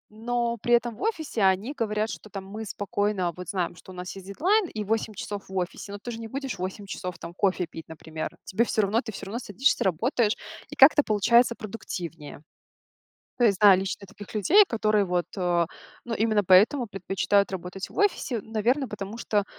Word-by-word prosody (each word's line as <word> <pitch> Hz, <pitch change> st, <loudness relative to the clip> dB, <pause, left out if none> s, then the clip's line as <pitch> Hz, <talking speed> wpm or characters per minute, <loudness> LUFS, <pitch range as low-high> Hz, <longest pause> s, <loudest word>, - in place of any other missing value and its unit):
Но 235 Hz, +1 st, -1 dB
при 240 Hz, 0 st, +4 dB
этом 235 Hz, -1 st, 0 dB
в -, -, -14 dB
офисе 320 Hz, -, -2 dB
они 195 Hz, +8 st, +2 dB
говорят, 215 Hz, -2 st, 0 dB
что 215 Hz, -, -8 dB
там: 195 Hz, 0 st, -7 dB
"Мы 215 Hz, +3 st, -7 dB
спокойно 205 Hz, -3 st, -1 dB
вот 180 Hz, 0 st, -8 dB
знаем, 180 Hz, -3 st, -2 dB
что 185 Hz, -, -13 dB
у -, -, -11 dB
нас 180 Hz, +1 st, -6 dB
есть 190 Hz, 0 st, -10 dB
дедлайн 370 Hz, -, +2 dB
и 215 Hz, -6 st, -4 dB
8 220 Hz, 0 st, -1 dB
часов 200 Hz, 0 st, -6 dB
в 190 Hz, -, -5 dB
офисе, 185 Hz, +2 st, -4 dB
но 205 Hz, -, -5 dB
ты 240 Hz, +4 st, -7 dB
же 225 Hz, -, -6 dB
не 225 Hz, -, -6 dB
будешь 270 Hz, -3 st, -5 dB
8 190 Hz, +2 st, -4 dB
часов 180 Hz, -2 st, -6 dB
там 170 Hz, +1 st, -9 dB
кофе 185 Hz, -1 st, +1 dB
пить, 165 Hz, -1 st, -10 dB
например". 160 Hz, 0 st, -7 dB
Тебе 220 Hz, +5 st, +1 dB
всё 215 Hz, -2 st, +1 dB
равно 215 Hz, +5 st, +2 dB
ты 220 Hz, -, -7 dB
всё -, -, -8 dB
равно 215 Hz, +5 st, -4 dB
садишься, 250 Hz, +4 st, +1 dB
работаешь, 220 Hz, -, +1 dB, 0.3 s
и -, -, -8 dB
как-то 295 Hz, +2 st, +7 dB
получается 235 Hz, +3 st, +4 dB
продуктивнее. 175 Hz, -, -7 dB, 1.0 s
То 240 Hz, -, +5 dB
есть 200 Hz, -4 st, +3 dB
знаю 195 Hz, -3 st, +8 dB
лично 195 Hz, +1 st, -4 dB
таких 205 Hz, +2 st, -12 dB
людей, 375 Hz, -, +6 dB
которые 215 Hz, -3 st, +2 dB
вот, 180 Hz, -1 st, 0 dB
э, 175 Hz, -2 st, +2 dB, 0.4 s
ну, 235 Hz, -, -3 dB
именно 215 Hz, -2 st, +2 dB
поэтому 210 Hz, +8 st, +5 dB
предпочитают 195 Hz, 0 st, +1 dB
работать 185 Hz, +1 st, -5 dB
в -, -, -14 dB
офисе, 385 Hz, -, +1 dB
в -, -, -12 dB
наверное, 235 Hz, +5 st, 0 dB
потому 210 Hz, +1 st, -6 dB
что, 210 Hz, -3 st, 0 dB
205 Hz, 200 wpm, -26 LUFS, 190-235 Hz, 1.0 s, знаю